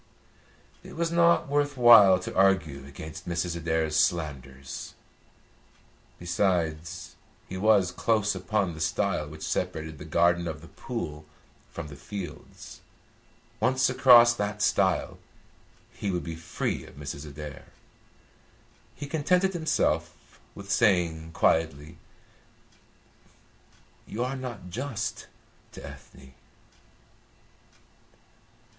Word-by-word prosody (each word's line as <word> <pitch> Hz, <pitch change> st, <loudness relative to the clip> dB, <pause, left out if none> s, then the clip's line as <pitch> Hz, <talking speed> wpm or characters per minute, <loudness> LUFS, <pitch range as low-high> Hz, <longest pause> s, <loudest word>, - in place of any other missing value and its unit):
It -, -, -12 dB
was 165 Hz, 0 st, -1 dB
not 170 Hz, -1 st, +4 dB
worth 145 Hz, 0 st, 0 dB
while 115 Hz, -6 st, +8 dB
to -, -, -6 dB
argue 80 Hz, -8 st, +2 dB
against 80 Hz, +4 st, -9 dB
Mrs. 85 Hz, 0 st, -2 dB
Adair's 80 Hz, -2 st, -1 dB
slanders. 70 Hz, -5 st, -4 dB, 1.2 s
Besides, 85 Hz, -1 st, -2 dB, 0.3 s
he 95 Hz, -, -7 dB
was 100 Hz, -2 st, +3 dB
close 105 Hz, -3 st, +1 dB
upon 95 Hz, 0 st, -1 dB
the 80 Hz, -, -9 dB
stile 80 Hz, -1 st, 0 dB
which 75 Hz, +1 st, -10 dB
separated 80 Hz, -2 st, -3 dB
the -, -, -8 dB
garden 85 Hz, +2 st, +2 dB
of 80 Hz, -2 st, -5 dB
The 80 Hz, -, -13 dB
Pool 75 Hz, -, -6 dB, 0.4 s
from 85 Hz, -, -7 dB
the 70 Hz, -, -10 dB
fields. 90 Hz, 0 st, -9 dB, 0.8 s
Once 130 Hz, 0 st, +2 dB
across 120 Hz, -2 st, +7 dB
that 105 Hz, -2 st, -3 dB
stile, 95 Hz, -3 st, +1 dB, 0.7 s
he 100 Hz, -, -4 dB
would 90 Hz, -2 st, -2 dB
be 80 Hz, -, -5 dB
free 80 Hz, 0 st, -3 dB
of -, -, -15 dB
Mrs. 70 Hz, +1 st, -7 dB
Adair. 75 Hz, 0 st, -9 dB, 1.3 s
He 145 Hz, -, -6 dB
contented 180 Hz, +6 st, +1 dB
himself 160 Hz, -2 st, -1 dB, 0.2 s
with 100 Hz, 0 st, -8 dB
saying 85 Hz, -7 st, +2 dB
quietly: 80 Hz, 0 st, 0 dB, 2.1 s
"You 115 Hz, +3 st, -3 dB
are 130 Hz, +2 st, -2 dB
not 120 Hz, -8 st, -7 dB
just 115 Hz, 0 st, -4 dB, 0.5 s
to -, -, -9 dB
Ethne." 65 Hz, 0 st, -13 dB
90 Hz, 105 wpm, -27 LUFS, 80-115 Hz, 2.1 s, while